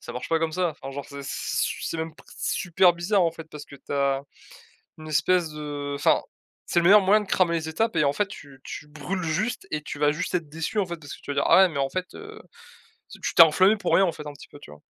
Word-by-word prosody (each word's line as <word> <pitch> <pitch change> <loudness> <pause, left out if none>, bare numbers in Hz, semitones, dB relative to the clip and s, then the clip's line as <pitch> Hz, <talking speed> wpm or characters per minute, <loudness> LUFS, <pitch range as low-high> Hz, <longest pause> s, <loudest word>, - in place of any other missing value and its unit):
Ça - - -9
marche 125 - -6
pas 165 0 +1
comme 165 - 0
ça, 180 0 0
enfin, 135 -2 -9
genre, 140 +1 -6
c'est 140 -1 -8
c 135 - -6 0.3
su - - -2
c'est - - -3
même 160 -1 -4
p - - -18
s - - -4
super 180 0 +3
bizarre 185 +3 +1
en 170 - +2
fait 165 0 -10
parce 150 -1 -9
que 140 - -13
tu 140 - -10
as 140 -1 +1 0.8
une 155 - -10
espèce 175 +2 +2
de 145 -2 -5
enfin, 140 - +3 0.4
c'est 170 - +1
le - - 0
meilleur 205 +2 +8
moyen 200 +3 +4
de 210 - -7
cramer 175 -3 +2
les 160 -1 -3
étapes 220 +8 -1
et 150 - +3
en 140 - +2
fait 205 +7 0
tu 140 -7 -12
tu 150 - -8
brûles 160 +5 -5
juste 190 +9 -2
et 150 - -2
tu 145 - -7
vas 150 0 +3
juste 170 +2 -4
être 170 -3 -2
déçu, 165 +8 -3
en 195 - +1
fait, 175 -1 -5
parce 145 - -10
que - - -9
tu - - -36
te 145 - -4
vas - - -4
dire: 140 - +2
«Ah 170 - +6
ouais, 190 0 +7
mais, 140 -4 -4
en 135 - 0
fait, 185 +5 -3
heu», 430 0 -10 0.7
te - - -11
tu - - -3
t'es 165 - +10
enflammé 185 +6 +4
pour 200 -4 -2
rien 195 - +5
en 170 - -1
fait 150 - -9
un 150 - -5
petit 145 - -14
peu. 145 - -14
Tu - - -13
vois? 75 - -14
160 Hz, 295 wpm, -25 LUFS, 145-185 Hz, 0.8 s, t'es